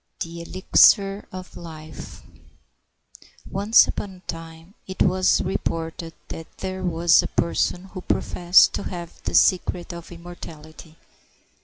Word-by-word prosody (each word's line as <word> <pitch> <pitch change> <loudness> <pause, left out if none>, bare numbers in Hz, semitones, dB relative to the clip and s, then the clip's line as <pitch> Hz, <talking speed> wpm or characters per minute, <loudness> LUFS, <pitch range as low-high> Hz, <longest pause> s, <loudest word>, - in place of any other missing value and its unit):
THE 170 0 -5
ELIXIR 195 +3 +3
OF 185 0 -9
LIFE 155 -2 -10 1.2
Once 205 +4 +5
upon 195 -2 -5
a - - -16
time 165 +1 -9
it 190 -1 0
was 185 0 +2
reported 165 -2 -4 0.2
that 165 - -7
there 190 0 -5
was 170 -1 +4
a - - -4
person 175 +1 -1
who 185 - -6
professed 175 0 +3
to - - -3
have 170 -2 -8
the - - -2
secret 180 -1 +2
of 170 0 -10
immortality. 165 -2 -12
175 Hz, 125 wpm, -23 LUFS, 165-185 Hz, 1.2 s, Once